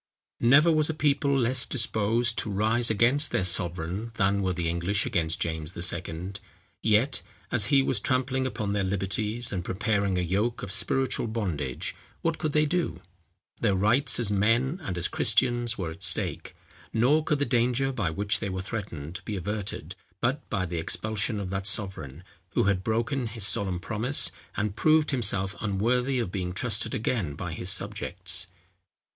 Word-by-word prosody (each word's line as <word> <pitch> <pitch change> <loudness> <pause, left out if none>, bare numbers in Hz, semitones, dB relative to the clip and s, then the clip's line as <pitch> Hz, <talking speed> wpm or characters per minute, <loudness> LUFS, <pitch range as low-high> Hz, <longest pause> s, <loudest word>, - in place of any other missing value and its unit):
Never 140 +8 +6
was 155 -1 +2
a 160 - -2
people 140 -2 +2
less 125 0 +2
disposed 115 -1 0
to - - -2
rise 110 +4 +2
against 125 +7 +3
their 95 - 0
sovereign 90 +4 -1
than 100 -1 +2
were 95 -1 0
the 85 -2 -2
English 85 +4 0
against 85 -9 0
James 80 +1 -3
II. 85 +1 -3 0.5
Yet, 115 +5 +2 0.3
as 115 -4 +4
he 135 +5 +4
was 130 -5 +1
trampling 130 +2 0
upon 105 -5 -3
their 100 -1 0
liberties, 105 +5 0
and 90 -3 -3
preparing 100 0 0
a - - +1
yoke 100 +7 -1
of 100 - -5
spiritual 130 +4 0
bondage, 85 - -3 0.3
what 165 -1 0
could 155 - -1
they 150 +1 +3
do? 175 +3 -1 0.6
Their 105 -4 +2
rights 110 +10 +3
as 110 -4 0
men 115 - +2
and 90 -10 -4
as 85 - +1
Christians 120 +1 +2
were 85 -4 -3
at 85 +4 -11
stake; 85 -4 +2 0.4
nor 135 +7 +3
could 150 - +1
the 145 - 0
danger 125 +2 +1
by 105 -10 -1
which 100 +5 0
they 100 - -3
were 95 0 -4
threatened, 90 -6 -6
be 105 - -4
averted, 105 +2 -4 0.2
but 130 +4 -1
by 95 - -1
the 85 -1 -3
expulsion 105 +5 -1
of 95 -2 -4
that 95 0 -1
sovereign, 95 - -3 0.3
who - - +2
had 100 -2 +1
broken 120 +4 -1
his 110 -2 -1
solemn 95 -2 0
promise, 115 +8 +2 0.3
and 105 -1 -1
proved 155 +4 +3
himself 100 -6 0
unworthy 120 +6 +1
of 115 -7 -2
being 90 -2 -3
trusted 105 +2 0
again 105 - -1
by 85 0 -5
his 90 +3 -3
subjects. 95 -3 0
105 Hz, 170 wpm, -27 LUFS, 95-125 Hz, 0.6 s, Never